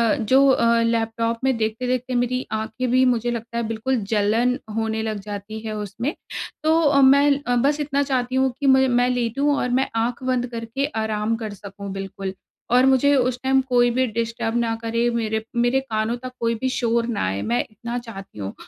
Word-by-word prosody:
जो 260 +5 +4
अ, 235 -3 +3
लैपटॉप 230 0 0
में 265 -1 +2
देखते-देखते 250 +3 -1
मेरी 245 +1 0
आँखें 220 +3 -2
भी, 255 +1 +4
मुझे 240 -1 +1
लगता 235 0 -5
है, 235 - 0
बिल्कुल 225 +4 -1 0.2
जलन 225 +4 +2 0.2
होने 220 0 -1
लग 215 -2 -3
जाती 205 +1 -7
है 220 0 -5
उसमें। 215 - -3 0.5
तो 320 +1 +4
अ, 285 -3 +4
मैं 280 +1 +5
अ, 245 -2 0
बस 280 +5 +2
इतना 285 -1 0
चाहती 255 -2 -1
हूँ 265 0 +2
कि 285 - -3
मु 265 0 +5
मैं 245 0 +3
लेटूँ 250 +4 +1
और 250 - -1
मैं 265 - +1
आँख 235 +3 -1
बंद 255 -1 0
करके 230 +4 -3 0.2
आराम 215 +1 -1
कर 220 -2 -5
सकूँ 200 0 -9
बिल्कुल 195 0 -5 0.4
और 250 +1 +5
मुझे 270 +2 +4
उस 255 -1 +1
टाइम 265 0 +3
कोई 245 -1 +4
भी 260 +2 +1
डिस्टर्ब 230 0 -2
ना 230 -1 0
करे, 230 +1 0
मेरे 220 -2 -1
मेरे 240 +2 +2
कानों 225 -3 -2
तक 255 - -5
कोई 230 0 0
भी 260 +4 -2
शोर 235 -2 0
ना 235 -3 -2
आए, 95 +1 -2
मैं 115 +4 0
इतना 235 +3 -5
चाहती 195 - -10
हूँ। 100 -1 -4
235 Hz, 195 wpm, -22 LUFS, 220-255 Hz, 0.5 s, मैं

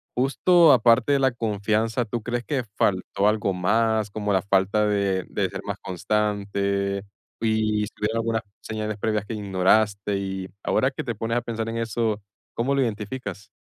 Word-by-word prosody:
justo 155 +5 +5
aparte 120 +2 +4
de 140 - +4
la 135 0 +4
confianza, 110 +1 0
¿tú 115 +1 -4
crees 120 0 -2
que 135 -5 -1
faltó 100 +1 +1
algo 105 -2 +1
más, 110 +3 +1
como 105 0 -2
la 95 - +3
falta 100 +2 +2
de 100 -3 0
de - - -1
ser - - -6
más - - -3
constante? 100 0 -1 0.4
Y 110 -1 +1
si - - -7
tuvieron 110 +2 -1
algunas 115 0 0 0.2
señales 110 -1 -4
previas 105 -1 -1
que 115 - -5
ignoraste, 100 +1 +2
y 95 -1 -4 0.2
ahora 130 - +2
que - - -5
te 120 -3 -3
pones 115 +3 -1
a - - +1
pensar 115 -1 -4
en 115 - -3
eso, 115 -1 -1 0.4
¿cómo 130 +4 0
lo 140 - +2
identificas? 105 -3 -4
110 Hz, 170 wpm, -24 LUFS, 100-115 Hz, 0.4 s, justo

